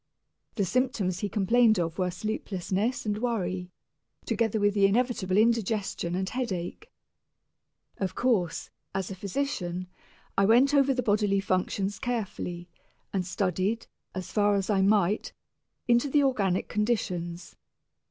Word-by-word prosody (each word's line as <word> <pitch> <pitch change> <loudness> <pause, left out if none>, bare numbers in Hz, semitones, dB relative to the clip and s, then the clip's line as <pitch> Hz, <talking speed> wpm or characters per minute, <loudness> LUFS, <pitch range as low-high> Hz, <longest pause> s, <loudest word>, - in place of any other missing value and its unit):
The 200 - +1
symptoms 205 -5 0
he 205 - -2
complained 220 +2 +4
of 165 0 -2
were 180 -1 +1
sleeplessness 200 +4 -2
and 210 0 -1
worry, 185 -7 -2 0.6
together 225 -2 0
with 205 0 +3
the 200 -1 +5
inevitable 205 -4 +1
indigestion 215 -5 +1
and 190 +1 -1
headache. 235 - -4 1.1
Of 190 -2 -2
course, 210 -10 0 0.2
as 195 0 -2
a - - -5
physician, 185 -4 -3 0.5
I 195 - +4
went 250 +7 +5
over 275 -1 +5
the 250 -1 0
bodily 205 -2 +2
functions 195 +1 -1
carefully, 200 -8 -3 0.5
and 185 -3 -1
studied, 190 +4 -1 0.3
as 185 -1 -5
far 205 -1 +3
as 195 +1 0
I 195 -2 +3
might, 200 0 +2 0.5
into 240 +4 +3
the 290 +1 +4
organic 200 -9 +1
conditions. 180 -6 -2
205 Hz, 130 wpm, -28 LUFS, 185-230 Hz, 1.1 s, the